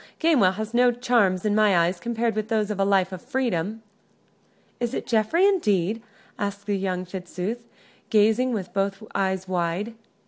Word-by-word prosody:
Gamewell 280 - +4
has 215 +3 -5
no 245 +1 +5
charms 235 -6 +1
in 210 - +2
my 210 -3 +4
eyes 175 +1 +1
compared 230 +1 -1
with 215 0 -2
those 215 -2 0
of 205 - -4
a - - +3
life 195 -1 +2
of 185 -2 -7
freedom." 225 -5 -2 1.0
"Is 240 +1 -2
it - - -3
Geoffrey, 230 - +2
indeed?" 215 - +1 0.4
asked 200 0 -4
young 190 -3 -1
Fitzooth, 190 +5 -5 0.4
gazing 220 +4 +3
with 195 -6 -4
both 195 +1 -1
eyes 190 -1 -1
wide. 180 +4 -2
210 Hz, 160 wpm, -24 LUFS, 190-235 Hz, 1.0 s, no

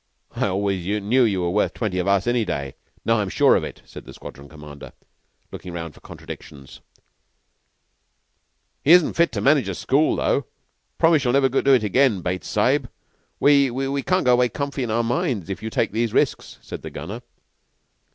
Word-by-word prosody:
"I - - 0
always 95 -1 -1 0.2
knew 125 +5 +3
you 100 -5 +1
were 85 0 -1
worth 105 +3 0
twenty 100 -6 -2
of 90 - -2
us 100 -1 +2
any 120 -1 +1
day. 70 -9 -4 0.3
Now - - +3
I'm - - -2
sure - - +4
of - - 0
it," - - -8
said - - -11
the - - -13
Squadron 70 +1 -11
Commander, 75 -2 -12 0.6
looking 90 - -8
round 85 -2 -6
for - - -18
contradictions. 70 -2 -11 2.0
"He 155 - +6
isn't 180 -3 +5
fit 170 0 +2
to - - -2
manage 140 -7 +3
a 95 - -4
school, 145 - +1
though. 140 -5 0 0.5
Promise 165 -4 +4
you'll 120 - +1
never 135 -1 +3
do 135 +1 +3
it 120 - +1
again, 110 -1 +2
Bates 90 +1 -3
Sahib. 125 +4 +1 0.5
We 140 -2 +4
we 135 +3 -2
can't 185 +3 0
go 125 - +5
away 125 0 +3
comfy 140 0 -4
in 120 - -2
our 115 +2 +1
minds 115 -5 -2
if 95 - -6
you 110 - -4
take 110 - -1
these 115 +1 -1
risks," - - 0
said - - -8
the - - -7
Gunner. - - -7
115 Hz, 190 wpm, -22 LUFS, 95-135 Hz, 2.0 s, He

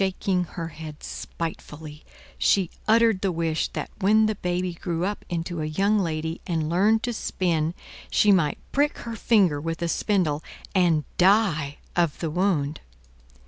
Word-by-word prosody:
Shaking 190 -1 0
her 165 -1 -3
head 155 -1 -9
spitefully, 155 -2 -7 0.4
she 190 -4 +3 0.2
uttered 225 -3 +4
the 195 - +1
wish 165 -2 0
that - - -4
when 215 +2 +4
the 215 - +1
baby 180 -2 -2
grew 170 0 -2
up 205 +1 -3
into 170 -1 -3
a - - -1
young 195 +7 +2
lady, 160 -2 -2
and 160 -3 -1
learned 210 +6 +3
to 240 - -1
spin, 170 -6 -1 0.3
she 210 - +4
might 170 -7 +3
prick 290 +2 +1
her 230 -1 -4
finger 190 -11 +3
with 165 +1 -3
a - - +1
spindle 170 -5 0 0.3
and 170 -5 +3 0.2
die 180 -7 +3 0.2
of 170 -4 +1
the 165 -3 -3
wound. 160 -5 0
175 Hz, 155 wpm, -25 LUFS, 160-200 Hz, 0.4 s, uttered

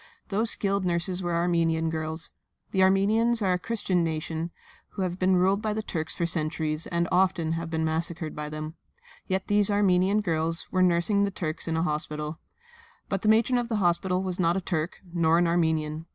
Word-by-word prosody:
Those 220 +3 +2
skilled 200 -2 +1
nurses 180 +1 +1
were 175 -1 -1
Armenian 165 -1 +1
girls. 160 0 -3 0.4
The 190 - +1
Armenians 215 +5 +3
are 185 -2 +2
a 180 - -1
Christian 190 -5 -1
nation, 160 +1 -3 0.4
who 195 - -2
have 180 0 -3
been 185 0 +3
ruled 190 +3 +2
by 215 -1 -1
the 215 +1 -3
Turks 160 -5 -4
for 170 - -1
centuries 155 -1 -1
and 170 -1 0
often 180 -3 +2
have 165 0 -3
been 160 -1 -1
massacred 160 0 -3
by 150 0 -5
them; 155 +1 -6 0.5
yet 190 0 -1
these 205 0 +4
Armenian 200 0 +3
girls 165 -2 -1
were 185 - +1
nursing 185 +3 +3
the 200 - +1
Turks 165 -4 -3
in 165 - -1
the 160 - +1
hospital. 150 -1 -3 0.7
But 195 -1 -1
the 215 - +1
matron 230 +3 +4
of 240 -1 -3
the 225 - 0
hospital 180 -1 +1
was 185 -1 -3
not 170 +1 +2
a - - -1
Turk, 165 -2 -2 0.2
nor 165 -1 +3
an 175 - +3
Armenian. 160 -2 0
175 Hz, 195 wpm, -27 LUFS, 160-195 Hz, 0.7 s, these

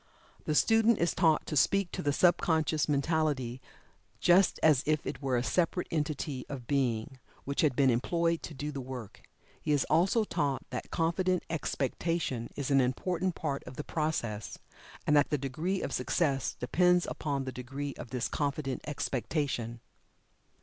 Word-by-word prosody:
The 155 - 0
student 225 +4 +4
is 170 - +1
taught 160 -4 +3
to 150 - -4
speak 195 +6 +3
to - - -4
the 145 - +1
sub 175 +5 +4
conscious 155 -2 +1
mentality 140 -4 0 0.6
just 180 +2 +4
as 150 -5 +5
if 155 -1 +1
it - - -5
were 130 -3 +1
a 120 - 0
separate 180 +5 +1
entity 150 -4 -2
of 135 -4 -6
being, 130 -1 -1 0.2
which 140 +1 -1
had 145 -5 +2
been 135 0 +4
employed 165 +7 +1
to 155 - -7
do 145 +2 -4
the 140 -2 -5
work. 125 -5 -8 0.4
He - - -1
is 145 - +2
also 185 +8 +4
taught 140 -9 -1
that - - -5
confident 180 +2 +1
expectation 150 -4 -2
is 140 -1 -3
an 135 -1 +5
important 175 +8 -1
part 140 -3 -3
of 125 - -9
the 150 - -4
process, 120 -11 -2 0.5
and 150 - +3
that 145 - +4
the 150 - +1
degree 155 +8 -2
of - - -3
success 140 -6 0
depends 180 +7 +3
upon 140 -3 -2
the 130 - -4
degree 135 +3 -5
of 120 - -9
this 125 -2 -1
confident 140 -2 -2
expectation. 130 -4 -2
145 Hz, 165 wpm, -30 LUFS, 130-165 Hz, 0.6 s, as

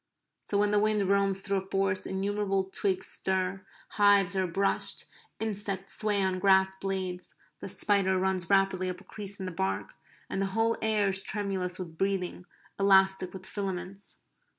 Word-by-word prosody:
So 200 - -1
when 205 0 +3
the 210 - +4
wind 215 -1 +2
roams 195 0 +2
through 200 0 0
a 190 0 -11
forest 195 -1 0
innumerable 195 0 0
twigs 190 0 -1
stir; 190 0 -1 0.3
hives 200 -2 +4
are 190 -1 +1
brushed; 195 +3 0 0.3
insects 200 -3 -3
sway 205 -2 +1
on 185 -1 0
grass 190 0 +4
blades; 190 -2 -4 0.2
the - - -6
spider 195 -2 +2
runs 185 -2 0
rapidly 195 -2 +2
up 180 0 -5
a - - -15
crease 200 -1 -8
in 190 - -4
the 185 - -4
bark; 95 - -2 0.3
and 195 - -2
the 195 - +1
whole 225 +1 +3
air 215 -2 +3
is 190 0 +2
tremulous 195 -3 -2
with 165 -3 -8
breathing; 190 -2 -1 0.3
elastic 190 -1 +4
with 190 -1 -8
filaments. 190 -1 -4
195 Hz, 165 wpm, -29 LUFS, 185-200 Hz, 0.3 s, the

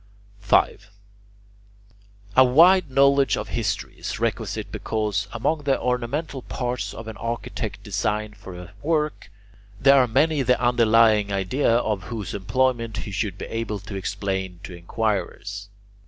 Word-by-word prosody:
5. 100 0 +2 1.5
A 130 - +8
wide 165 +7 +5
knowledge 140 +1 +4
of - - -5
history - - -3
is - - -4
requisite - - -2
because, 105 -3 -2
among 150 +7 -1
the 140 -2 +1
ornamental 125 +4 -2
parts 125 0 -3
of 115 - -9
an 110 - -7
architect's 115 0 -4
design 105 +1 -2
for 100 -3 -11
a 90 -1 -10
work, 150 -7 -1 0.5
there 140 +3 +6
are 125 - +2
many 145 +5 +2
the 125 -1 +2
underlying 115 -3 +4
idea 100 +8 0
of 105 -5 -1
whose 110 -4 -5
employment 115 +2 0
he 105 - -6
should 100 -1 -2
be - - -6
able 115 -2 -3
to 100 +1 -10
explain 95 -2 -3
to 95 - -8
inquirers. 100 +1 -3
115 Hz, 140 wpm, -24 LUFS, 100-130 Hz, 1.5 s, A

